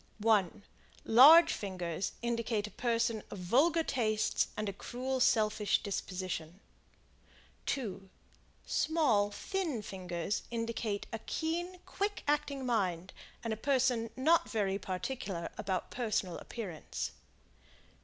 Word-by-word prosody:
1 210 -2 +2 0.4
Large 310 +8 +9
fingers 180 -3 -3
indicate 230 -3 -1
a 210 - -8
person 230 -2 0
of - - -7
vulgar 285 - +3
tastes 215 -7 +1
and 215 - -2
a 200 - -2
cruel, 255 +6 -3
selfish 215 -3 +2
disposition. 185 -3 -4 1.1
2 195 -8 -3 0.6
Small, 265 -11 +2
thin 310 - -3
fingers 180 0 -3
indicate 230 -3 -2
a 225 - -2
keen, 345 +3 -2
quick 410 0 -3
acting 290 -2 0
mind 185 -7 0 0.3
and 230 -2 -1
a - - -2
person 250 -1 +1
not 315 +6 +3
very 200 -3 0
particular 190 -1 -4
about 185 -2 -3
personal 215 -7 -1
appearance. 160 - -5
220 Hz, 110 wpm, -32 LUFS, 195-260 Hz, 1.1 s, Large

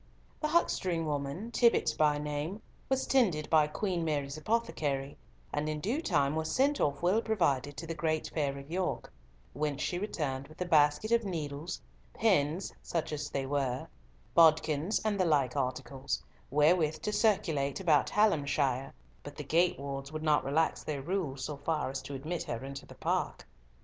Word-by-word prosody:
The 305 - 0
huckstering 185 - +1
woman, 150 +9 -3
Tibbott 235 -1 +3
by 150 -1 +3
name, 150 +7 -4 0.3
was 265 0 +1
tended 185 - +2
by 155 -2 +5
Queen 175 +2 -2
Mary's 145 -3 -1
apothecary, 155 -8 -1 0.4
and 150 +1 -1
in 155 0 -2
due 230 - -1
time 145 - +2
was 160 0 -1
sent 280 - +2
off 140 +2 0
well 190 +6 +3
provided, 145 - 0
to 165 - -5
the 165 - -3
great 155 0 -1
fair 140 -3 -1
of 140 +3 -10
York, 185 - -2 0.4
whence 145 0 -2
she 175 - -1
returned 140 -9 -3
with 155 +2 -16
a 180 - -1
basket 150 +4 +3
of 235 0 +4
needles, 155 -5 -4 0.4
pins 180 -5 +1
(such 165 -2 -2
as 150 - -3
they 135 -1 -2
were), 135 -2 -1 0.5
bodkins, 160 +2 +4
and 205 -2 +1
the 185 - +3
like 140 -6 +2
articles, 130 0 -2 0.3
wherewith 155 +2 +3
to 210 - -1
circulate 160 - +1
about 160 -6 +3
Hallamshire, 140 - +1 0.3
but 145 0 -9
the 150 - -6
gate 170 +5 +2
wards 140 0 -5
would 155 0 -5
not 150 -1 +3
relax 155 +4 +1
their 145 -3 -4
rules 150 -6 -2
so 150 -2 -5
far 145 -1 -1
as 135 - -4
to 140 - -7
admit 155 +6 -3
her 120 +3 -4
into 140 0 -7
the - - -12
park. - - -1
155 Hz, 170 wpm, -31 LUFS, 140-180 Hz, 0.5 s, by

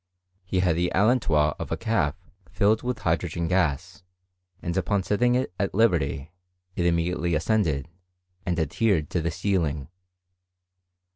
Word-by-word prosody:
He 90 0 0
had 90 -3 +2
the 90 +1 0
allentois 95 -9 +3
of - - -5
a - - 0
calf 85 -10 0 0.3
filled 105 +5 +2
with 125 -1 -2
hydrogen 85 -2 -1
gas, 90 -2 0 0.6
and 85 0 -4
upon 95 +1 0
setting 120 +5 +2
it 125 -7 -1
at 100 -2 -1
liberty, 80 - +1 0.4
it 85 - +1
immediately 85 0 0
ascended, 80 -5 +1 0.6
and 90 -2 -1
adhered 80 +1 +1
to 85 - 0
the 85 - -1
ceiling. 85 -6 -1
90 Hz, 135 wpm, -25 LUFS, 80-100 Hz, 0.6 s, allentois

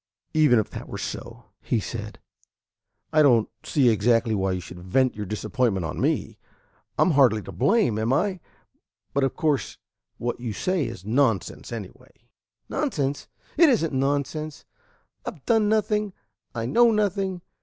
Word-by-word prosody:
"Even 150 -6 +5
if 110 - 0
that - - -7
were - - -5
so," - - -7
he 120 - 0
said, 110 0 -6 0.9
"I 155 - +5
don't 120 -7 +5 0.2
see 135 -5 +3
exactly 115 +1 +2
why 95 -2 0
you 90 - -2
should 90 0 -10
vent 125 +9 +1
your 105 -1 -5
disappointment 110 -2 -1
on 80 - -4
me. - - -1 0.6
I'm - - +4
hardly 125 -8 +4
to - - -8
blame, 195 - +2
am 110 +3 0
I? 185 +6 +1 0.7
But 140 - +1
of 135 - 0
course 155 -6 0 0.4
what 120 0 -3
you 120 -3 -4
say 180 - 0
is 115 -5 -8
nonsense 115 - 0
anyway." 110 -5 -10 0.4
"Nonsense? 140 0 -2 0.3
It 335 -1 +7
is 240 -9 +3
n't 155 - -4
nonsense. 145 +3 -2 0.6
I've 185 - -8
done 220 -2 +3
nothing. 210 -2 +1 0.4
I 115 -1 -2
know 235 - +5
nothing. 195 -4 0
135 Hz, 155 wpm, -25 LUFS, 110-180 Hz, 0.9 s, It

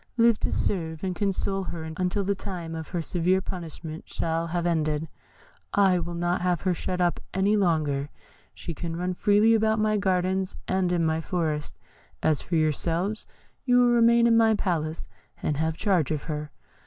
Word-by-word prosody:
Live 230 -2 +4
to - - -1
serve 160 -4 -1
and 185 -1 -2
console 195 -1 -1
her 170 -3 -5
until 185 +3 0
the 200 +1 +1
time 175 -4 -6
of 160 -1 -5
her 175 -2 -3
severe 180 +3 +1
punishment 165 -3 -7
shall 165 0 -1
have 170 +1 -2
ended. 155 -2 0 0.7
I 190 -3 +4
will 170 0 -4
not 175 +1 0
have 180 -2 +1
her 185 -2 +1
shut 180 +1 -3
up 175 -1 +1 0.2
any 195 +2 +3
longer; 155 -7 +1 0.5
she 170 - -6
can 165 +2 -5
run 180 +2 -2
freely 210 +4 +4
about 220 0 +2
my 215 0 +2
gardens 190 -1 0
and 185 -1 +1
in 170 -2 +1
my 160 0 0
forest; 155 -4 -2 0.5
as 155 -2 +2
for 170 - -3
yourselves, 165 +6 0 0.4
you 245 -2 +3
will 245 0 +5
remain 235 0 +5
in 230 -1 +5
my 225 -1 +5
palace, 165 -5 -2 0.4
and 150 - 0
have 160 +1 -1
charge 180 -8 +1
of 155 -3 -2
her. 150 -1 -4
180 Hz, 180 wpm, -26 LUFS, 160-195 Hz, 0.7 s, will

